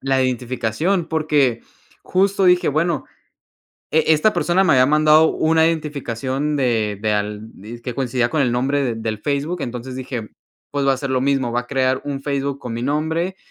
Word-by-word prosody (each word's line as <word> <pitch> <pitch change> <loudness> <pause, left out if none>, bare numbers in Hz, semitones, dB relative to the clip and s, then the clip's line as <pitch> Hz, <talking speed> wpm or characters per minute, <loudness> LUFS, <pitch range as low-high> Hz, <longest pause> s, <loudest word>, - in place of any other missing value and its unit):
la 135 -1 +1
identificación, 130 - -1
porque 150 -7 +1 0.5
justo 195 +1 +2
dije: 180 0 +4
"Bueno" 155 0 0 0.9
E 160 0 +3
esta 155 +8 +3
persona 185 +2 +2
me - - +4
había 130 - +5
mandado 155 +2 +5
una 160 0 +2
identificación 145 -2 -2
de 115 -6 0
de 110 0 0
al 105 +1 -3
dizque 120 +4 -8
coincidía 125 -2 0
con 155 - 0
el 125 - +1
nombre 135 +4 0
de 120 -3 -1
del 110 -1 -3
Facebook", 145 +4 -2
entonces 125 +1 -5
dije: 125 -4 -5 0.4
"Pues 140 -1 -1
va 135 - +4
a - - -6
ser 135 -1 -4
lo 130 -1 +1
mismo, 135 -3 0
va 120 - +1
a - - -19
crear 130 -1 0
un 140 -1 -4
Facebook 140 -1 -2
con 125 - -6
mi 120 - -4
nombre, 160 +6 -1
135 Hz, 180 wpm, -20 LUFS, 120-155 Hz, 0.9 s, había